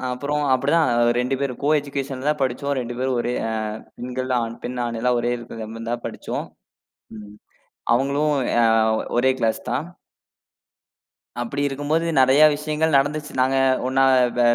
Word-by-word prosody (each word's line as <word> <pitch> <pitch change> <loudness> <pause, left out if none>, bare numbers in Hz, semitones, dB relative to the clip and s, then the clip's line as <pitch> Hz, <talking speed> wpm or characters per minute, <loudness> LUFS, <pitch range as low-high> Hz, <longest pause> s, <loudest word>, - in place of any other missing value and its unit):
அ, - - -9
அப்பறம் 145 +3 -2
அப்படித்தான். 145 +3 +2 0.3
2 125 +2 -1
பேரும் 135 -3 -3
கோ 145 - +1
எஜுகேஷன் 140 -1 -5
தான் 150 - -2
படிச்சோம். 135 +2 -1
2 120 0 -5
பேரும் 130 -1 0
ஒரே 120 - -2 0.2
ஆ - - -2 0.5
பெண்கள், 130 +1 -4
ஆண் 115 0 -5
பெண், 125 0 -4
ஆண் 115 -1 -4
எல்லாம் 125 0 +2
ஒரே 120 - -1
இருக்குறமாரி 115 +1 -6
படிச்சோம். - - -5 0.7
ம் 105 -1 -11 0.6
அவுங்களும் 140 +4 +1 0.2
எ - - +1
ஆ, - - +5 0.5
ஒரே 130 +2 +4
கிளாஸ் 110 -1 +1
தான். 135 +7 -1 1.6
அப்படி 140 +4 -3
இருக்கும்போது, 145 +4 -1 0.2
நெறையா 135 +4 +6
விஷயங்கள் 155 0 +1
நடந்துச்சு. 150 +2 -2
நாங்க 130 +1 +2 0.3
ஒண்ணா, 135 +1 +3 0.3
வ - - +3
130 Hz, 150 wpm, -22 LUFS, 120-145 Hz, 1.6 s, நெறையா